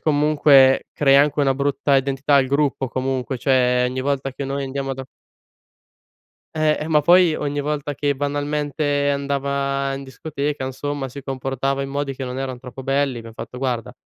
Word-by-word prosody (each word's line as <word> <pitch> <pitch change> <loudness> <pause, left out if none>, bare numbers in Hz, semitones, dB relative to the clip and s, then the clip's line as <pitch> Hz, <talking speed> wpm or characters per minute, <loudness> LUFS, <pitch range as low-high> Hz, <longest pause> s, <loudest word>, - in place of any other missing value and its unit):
comunque 145 -3 +4
crea 140 -1 +5
anche 145 +1 +1
una 135 -2 +3
brutta 140 0 +1
identità 135 +1 +1
al 135 - +4
gruppo 140 -1 0
comunque. 130 +1 -2
Cioè, 125 -1 +2
ogni 130 +1 -4
volta 135 0 -2
che 140 - -5
noi 140 +1 -3
andiamo 135 0 -3
da" 135 0 -7 1.5
Eh, 155 -1 +2
eh, 155 - -3
ma 150 -2 +3
poi 175 0 +5
ogni 145 -1 -2
volta 145 0 -3
che 145 0 0
banalmente 145 0 -1
andava 140 -1 -1
in 135 - -7
discoteca, 145 +1 -4
insomma, 135 +1 -4
si 140 +2 -9
comportava 135 0 -2
in 135 - -4
modi 140 0 -2
che 135 - -5
non 125 0 -5
erano 130 -2 -4
troppo 130 +1 -9
belli, 135 -1 0
abbiam 115 -1 -9
fatto 125 - -8
guarda: 125 -3 -2
140 Hz, 170 wpm, -21 LUFS, 135-145 Hz, 1.5 s, crea